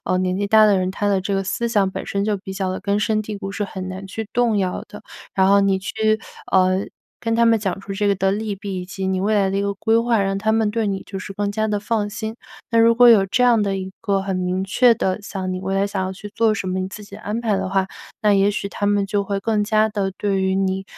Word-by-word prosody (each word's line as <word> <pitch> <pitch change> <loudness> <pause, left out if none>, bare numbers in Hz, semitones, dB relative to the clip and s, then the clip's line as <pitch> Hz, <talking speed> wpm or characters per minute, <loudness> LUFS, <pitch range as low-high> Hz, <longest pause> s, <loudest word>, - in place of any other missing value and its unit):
呃， 185 - +1
年 185 0 0
纪 200 - 0
大 215 +1 +6
的 205 -2 +4
人， 185 0 -1
他 205 +2 -1
的 195 -2 +2
这 200 0 -1
个 195 - 0
思 195 +5 -2
想 205 -4 +2
本 - - -6
身 200 0 -1
就 210 -1 +1
比 190 0 -8
较 190 -1 -2
地 185 - -4
根 200 +1 0
深 215 0 +1
蒂 210 -1 -6
固， 195 - -5
是 205 +1 -2
很 185 -1 -6
难 190 +1 -7
去 215 +2 -6
动 235 -3 +2
摇 185 -2 -2
的。 210 0 -11 0.3
然 190 0 +3
后 200 0 +5
你 195 -1 +2
去， 215 +2 0 0.3
呃， 185 0 +3 0.3
跟 230 -1 -1
他 235 - +4
们 230 -1 +4
讲 195 -2 -3
出 195 0 -7
这 205 +1 -1
个 200 - +3
的 190 0 +1
利 210 0 -2
弊 195 -1 -5
以 180 - -9
及 190 0 -4
你 190 0 0
未 210 +3 +1
来 195 -2 +2
的 195 - -1
一 200 - 0
个 200 0 -1
规 225 +3 +2
划， 230 -2 +2
让 195 0 -1
他 220 +2 +1
们 220 -1 +2
对 220 0 -1
你 195 -1 -2
就 195 - -6
是 195 - -7
更 205 +1 -2
加 215 +1 0
地 210 -1 -1
放 210 0 -1
心。 220 +1 -5 0.3
那 230 - +2
如 230 0 +6
果 245 +1 +7
有 215 -5 +7
这 250 +6 +1
样 235 -3 +4
的 195 -1 -1
一 190 0 -5
个 200 -3 +1
很 195 -1 -2
明 185 +1 -1
确 235 +5 +4
的， 190 -1 -1
想 190 -2 -4
你 185 - -3
未 190 +1 -2
来 195 +1 +2
想 195 -2 -2
要 185 - -3
去 205 +2 -9
做 225 -1 +3
什 195 -3 -3
么 185 0 -1
你 185 - -2
自 210 +2 -9
己 200 0 -11
安 215 +2 -4
排 220 -4 0
的 190 0 -2
话， 190 0 0 0.3
那 210 - +4
也 195 +1 +4
许 200 -1 -3
他 205 0 -3
们 205 -1 +2
就 200 0 -1
会 200 0 -2
更 210 0 0
加 215 0 +2
地 200 -3 -2
对 195 -2 0
于 190 0 +1
你 190 0 0
200 Hz, 310 characters per minute, -21 LUFS, 190-215 Hz, 0.3 s, 果